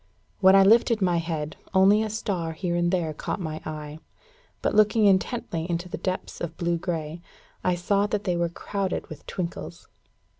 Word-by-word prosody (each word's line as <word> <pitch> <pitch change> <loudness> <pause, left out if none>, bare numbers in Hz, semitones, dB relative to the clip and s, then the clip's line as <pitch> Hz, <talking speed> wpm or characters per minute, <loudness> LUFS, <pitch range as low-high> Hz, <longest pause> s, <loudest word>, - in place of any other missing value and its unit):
When 190 0 +7
I 195 - +8
lifted 230 +2 +5
my 180 -3 +2
head, 160 -2 -3 0.2
only 195 +3 +6
a 220 - -1
star 185 -6 -2
here 175 +1 -2
and 175 0 +2
there 170 -4 0
caught 150 - -4
my 160 -3 -4
eye; 150 0 -6 0.6
but, - - +1
looking 215 +1 +4
intently 185 -4 +1
into 175 +1 -2
the 215 - -5
depths 185 0 -4
of 165 -1 -5
blue 170 -1 0
grey, 165 -2 -4 0.4
I 180 - +2
saw 200 +3 +1
that 210 -1 -2
they 180 -3 0
were 170 0 0
crowded 195 +2 -3
with 155 - -11
twinkles. 175 -2 -5
175 Hz, 180 wpm, -26 LUFS, 165-200 Hz, 0.6 s, I